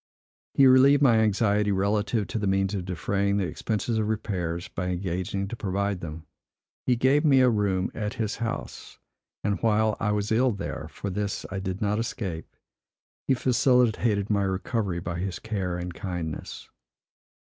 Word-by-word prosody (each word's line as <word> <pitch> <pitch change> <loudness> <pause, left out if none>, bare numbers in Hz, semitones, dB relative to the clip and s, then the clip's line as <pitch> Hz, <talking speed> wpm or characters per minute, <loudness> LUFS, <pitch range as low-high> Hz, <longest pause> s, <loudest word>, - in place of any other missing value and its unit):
He 135 - +6
relieved 135 +2 +6
my 120 -5 +6
anxiety 105 -1 +2
relative 105 +2 +1
to 115 - -2
the 100 - -1
means 95 +1 +1
of 95 -3 -3
defraying 100 +2 0
the 100 - +1
expenses 110 +6 -2
of 105 - 0
repairs, 90 -6 -2
by 90 +1 -4
engaging 90 +2 -2
to 120 - -4
provide 100 -2 -1
them. 80 -1 -7 0.6
He 125 - +4
gave 130 +5 +3
me 135 -4 +5
a 125 - +5
room 100 -4 0
at 105 -2 -3
his 110 -2 -2
house; 115 -1 -5 0.5
and 100 -1 -1
while 110 -1 +2
I 105 - 0
was 105 0 -1
ill 120 +2 +3
there 75 -5 -5
(for 100 +4 -6
this 100 +1 -3
I 95 - -3
did 95 0 -4
not 105 +1 +1
escape) 95 -8 -4 0.7
he 135 - +4
facilitated 120 -4 +2
my 100 -1 +2
recovery 95 0 -1
by 85 0 -4
his 95 0 -3
care 95 -6 -3
and 90 0 -5
kindness. 85 -5 -5
100 Hz, 165 wpm, -26 LUFS, 95-110 Hz, 0.7 s, He